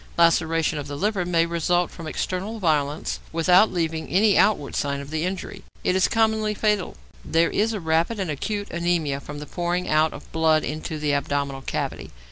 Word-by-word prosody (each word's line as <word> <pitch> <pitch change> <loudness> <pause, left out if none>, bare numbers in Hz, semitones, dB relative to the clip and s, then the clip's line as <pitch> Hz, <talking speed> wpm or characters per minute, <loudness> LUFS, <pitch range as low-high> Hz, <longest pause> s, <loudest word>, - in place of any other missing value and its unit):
Laceration 165 -2 +3
of 145 - -6
the 145 0 -5
liver 200 0 0
may 170 -2 +3
result 170 +1 0
from 165 -3 -8
external 190 +7 -3
violence 155 -5 0
without 180 +6 +4
leaving 165 -2 -2
any 200 +3 +3
outward 195 -9 +2
sign 140 -1 -1
of 140 +1 -9
the 160 0 -1
injury; 190 +1 -4 0.2
it 180 - +1
is 190 - +4
commonly 220 -1 +1
fatal. 210 - 0 0.3
There 165 +1 +2
is 220 +1 +1
rapid 165 +5 0
and 185 -5 -1
acute 205 +8 -3
anæmia 170 -5 -1
from 145 +1 -8
the 150 - -6
pouring 175 +3 -2
out 155 +1 +3
of 145 - -11
blood 160 -1 +3
into 155 +1 -4
the 150 -1 0
abdominal 140 -1 -1
cavity. - - -4
165 Hz, 180 wpm, -24 LUFS, 155-190 Hz, 0.3 s, without